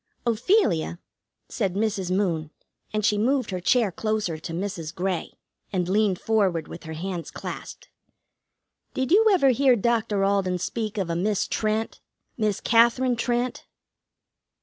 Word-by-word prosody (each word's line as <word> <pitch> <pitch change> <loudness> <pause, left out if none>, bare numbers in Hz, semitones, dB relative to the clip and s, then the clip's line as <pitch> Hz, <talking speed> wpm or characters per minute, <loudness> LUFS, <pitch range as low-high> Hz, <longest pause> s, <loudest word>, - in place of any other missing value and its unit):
"Ophelia," 230 - +2 0.5
said 195 -5 -2
Mrs. 205 -3 -1
Moon, 175 -5 0 0.4
and 215 -1 -1
she 210 -1 +2
moved 255 0 +1
her 185 - -2
chair 215 +3 +2
closer 215 -5 -2
to 165 - -7
Mrs. 170 -3 -4
Grey, 185 -1 -2 0.4
and 180 -3 -1
leaned 200 -1 +2
forward 195 -7 +1
with - - -10
her 160 - -6
hands 175 +1 -5
clasped, - - -8 1.1
"did 260 +1 -1
you 440 +4 +6
ever 335 -9 +4
hear 260 0 +4
Doctor 220 -3 +1
Alden 195 -2 +1
speak 215 +4 -3
of 185 -4 -1
a - - -1
Miss 200 +3 0
Trent 220 +1 -2 0.3
Miss 215 -3 0
Katherine 235 +2 +4
Trent?" 240 +1 -2
210 Hz, 140 wpm, -25 LUFS, 180-235 Hz, 1.1 s, you